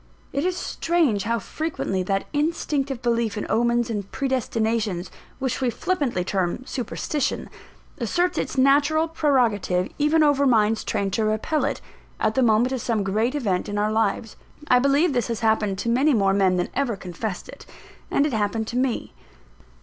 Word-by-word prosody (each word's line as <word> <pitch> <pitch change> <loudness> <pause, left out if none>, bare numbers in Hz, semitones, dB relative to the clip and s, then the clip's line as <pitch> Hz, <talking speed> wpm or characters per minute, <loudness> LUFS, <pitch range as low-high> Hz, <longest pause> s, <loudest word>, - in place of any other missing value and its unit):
It 280 - 0
is 365 0 0
strange 320 - 0
how 230 +1 +1
frequently 230 - -3
that 195 +1 -1
instinctive 290 -4 -1
belief 230 -3 0
in 210 - -3
omens 235 +1 +2
and 200 -3 -4
predestinations, 225 -7 -1 0.3
which 265 -1 -2
we 255 - +2
flippantly 280 - -1
term 185 +4 -1
Superstition, 265 +4 -3 0.5
asserts 360 +1 0
its - - -3
natural 285 +4 +4
prerogative 235 - +1
even 305 +2 +4
over 285 -2 +3
minds 220 -2 +3
trained 195 -1 -2
to 220 - +1
repel 220 +9 0
it, - - -2 0.4
at 215 - +1
the 265 - +2
moment 235 +1 +3
of 260 -3 -2
some 220 -3 0
great 220 +7 0
event 205 -11 -1
in 205 - -3
our 210 +1 +1
lives. 220 0 -1 0.3
I 250 - +6
believe 280 +5 +3
this 245 -3 0
has 230 -2 -3
happened 220 -3 +1
to 215 - -4
many 265 +4 +3
more 195 -2 +3
men 190 -2 +3
than 175 - -1
ever 265 -5 0
confessed 185 +1 -5
it; - - -12 0.4
and 280 - +2
it 295 - -1
happened 220 +1 0
to 245 - -3
me. 255 -2 -1
235 Hz, 170 wpm, -24 LUFS, 210-275 Hz, 0.5 s, I